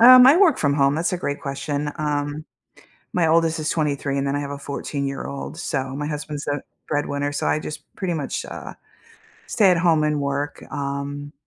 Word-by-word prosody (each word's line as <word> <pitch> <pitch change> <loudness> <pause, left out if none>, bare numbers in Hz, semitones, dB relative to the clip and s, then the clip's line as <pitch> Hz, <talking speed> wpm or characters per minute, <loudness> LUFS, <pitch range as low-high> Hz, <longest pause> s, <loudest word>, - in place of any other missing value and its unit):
Um, 250 +1 +10
I 280 +4 +8
work 355 -4 +5
from 145 -2 +2
home, 140 -1 +3
that's 165 +4 0
a 180 - -1
great 145 -4 -3
question, 145 +1 -2
um, 145 0 -2 0.7
my 175 -2 +2
oldest 165 0 +3
is 155 - -1
23 145 -3 0
and 140 - 0
then 140 +1 0
I - - 0
have 140 -1 -4
a 140 - -5
14-year-old, 140 0 -4
so 135 -5 -2
my 145 +1 -3
husband's 150 -1 -4
the 145 0 -1 0.3
breadwinner, 145 -1 -1
so 145 - -1
I - - +2
just 155 - -6
pretty 185 -3 -1
much, 145 -4 -3
uh, - - -8 0.7
stay 200 -5 +4
at 175 - +4
home 165 -3 +4
and 150 -1 +1
work, 140 +1 -2
um, 140 +1 -4
145 Hz, 195 wpm, -23 LUFS, 140-160 Hz, 0.7 s, Um